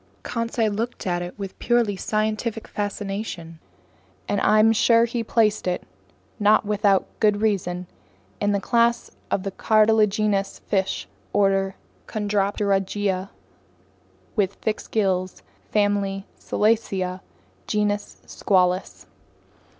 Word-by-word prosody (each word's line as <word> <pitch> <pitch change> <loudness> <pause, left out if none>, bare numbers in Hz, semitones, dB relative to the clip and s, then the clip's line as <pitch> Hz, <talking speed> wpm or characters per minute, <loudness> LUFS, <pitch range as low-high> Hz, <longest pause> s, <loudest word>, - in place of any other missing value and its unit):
Conseil 230 -2 -1
looked 230 +4 -3
at 175 -2 0
it 175 0 -7
with 195 -2 -7
purely 235 -4 +2
scientific 215 +2 -2
fascination, 195 -5 -4 0.7
and 205 -1 0
I'm 215 +1 +5
sure 230 +1 +4
he 235 0 -2
placed 215 -3 +1
it, 180 - -1 0.6
not 210 +1 +4
without 205 -2 +2
good 210 -2 +3
reason, 185 -4 0 0.5
in 205 - +1
the 200 - +1
class 235 +2 +1 0.2
of 190 - -1
cartilaginous 215 -2 +3
fish, 195 -2 -2 0.3
order 195 -1 +2 0.3
Chondropterygia 200 -2 0 1.1
with 200 -2 +1
fixed 220 -1 -3
gills, 185 -4 0 0.3
family 200 -2 0
Selacia, 195 -4 0 0.5
genus 205 -1 -1
Squalus. 185 -1 0
205 Hz, 100 wpm, -24 LUFS, 195-215 Hz, 1.1 s, I'm